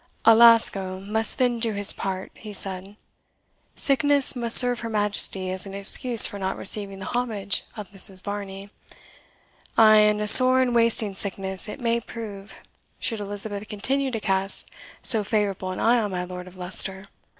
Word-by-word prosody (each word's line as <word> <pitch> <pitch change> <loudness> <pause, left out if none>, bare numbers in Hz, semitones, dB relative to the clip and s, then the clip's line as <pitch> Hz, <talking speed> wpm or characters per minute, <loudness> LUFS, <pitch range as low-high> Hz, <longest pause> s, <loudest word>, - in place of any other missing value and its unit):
"Alasco 225 -5 +4
must 215 +3 -2
then 245 -2 0
do 225 -1 -1
his 205 0 +2
part," 190 -1 -6
he 215 -1 -12
said. 195 0 -7 0.8
"Sickness 280 0 +2
must 235 -2 +4
serve 245 -1 +4
her 230 - -7
Majesty 205 -3 +1
as 190 +1 -5
an 195 - -9
excuse 220 +4 +6
for 200 - -5
not 190 0 -4
receiving 195 0 -1
the 190 - -9
homage 220 -5 -3
of 205 -3 -9
Mrs. 195 -1 -1
Varney 200 -1 -8 1.1
ay, 215 -1 +6
and 210 0 +2
a 210 - -3
sore 255 +4 +7
and 255 -2 0
wasting 230 -3 +1
sickness 190 0 -6
it 210 - -9
may 235 -1 -1
prove, 215 -3 -11 0.3
should 225 -3 -4
Elizabeth 205 0 -5
continue 265 +6 -2
to 230 -3 -4
cast 195 -1 -2 0.3
so 220 -3 +2
favourable 200 -3 -3
an 185 - -7
eye 240 +1 +2
on 210 -2 -3
my 180 -2 -5
Lord 180 0 -9
of 185 0 -15
Leicester. 190 +2 -1
205 Hz, 165 wpm, -23 LUFS, 195-230 Hz, 1.1 s, sore